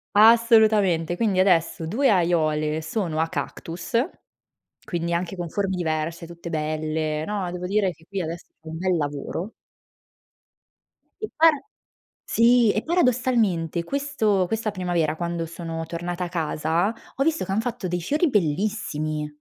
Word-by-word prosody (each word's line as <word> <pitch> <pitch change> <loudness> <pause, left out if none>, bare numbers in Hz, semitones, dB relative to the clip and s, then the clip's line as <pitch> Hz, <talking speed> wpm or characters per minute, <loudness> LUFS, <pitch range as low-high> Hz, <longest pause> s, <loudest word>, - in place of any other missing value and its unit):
Assolutamente 215 -6 +5
quindi 200 -2 +1
adesso 170 -3 +2
2 250 - +2
aiuole 155 -4 +1
sono 160 -1 -2
a 165 - +2
cactus, 170 +6 -5 0.9
quindi 170 -1 -2
anche 175 +2 -2
con 175 -1 -4
forme 195 0 -1
diverse, 165 -1 -2
tutte 170 0 -9
belle 155 0 -2
no, 195 -3 -3
devo 180 0 -4
dire 195 -1 +1
che 160 0 -18
qui 195 -1 -3
adesso 165 0 -5 0.2
c'è 160 - -16
un 160 - -5
bel 185 0 +1
lavoro. 150 +7 -4 1.7
E 430 - -4
para 320 -1 +5 0.7
sì 235 -1 +5
e 215 - 0
paradossalmente 235 - +1
questo 225 -5 0
questa 225 +1 -1
primavera 175 -5 0
quando 170 0 -3
sono 165 0 -5
tornata 175 +2 -4
a - - -6
casa, 165 +3 0 0.2
ho 275 - +2
visto 320 +2 0
che - - -5
han 205 +3 +1
fatto 240 -4 -4
dei 175 0 -2
fiori 295 - +1
bellissimi. 155 - -1
175 Hz, 140 wpm, -24 LUFS, 160-215 Hz, 1.7 s, Assolutamente